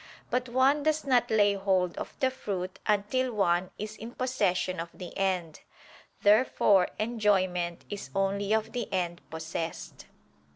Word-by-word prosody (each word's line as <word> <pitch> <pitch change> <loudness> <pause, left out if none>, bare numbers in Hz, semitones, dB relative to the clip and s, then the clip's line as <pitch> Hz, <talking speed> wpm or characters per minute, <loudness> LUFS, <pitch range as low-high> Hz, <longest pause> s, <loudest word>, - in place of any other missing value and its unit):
But 250 0 0
one 265 +4 +3
does 310 +1 0
not 245 -3 +3
lay 205 -2 +4
hold 190 -3 +1
of - - -7
the 260 -1 +2
fruit 190 -7 -5
until 215 +5 +1
one 180 -3 +1
is 215 +1 -5
in 230 +2 -9
possession 195 -8 0
of 165 +1 -4
the 180 - -9
end. 180 -5 -1 0.6
Therefore 205 -3 +5
enjoyment 190 -6 0
is 200 -10 -6
only 195 +1 0
of 220 0 +1
the 240 -1 -4
end 175 -3 -1
possessed. 160 0 -6
200 Hz, 140 wpm, -29 LUFS, 180-235 Hz, 0.6 s, Therefore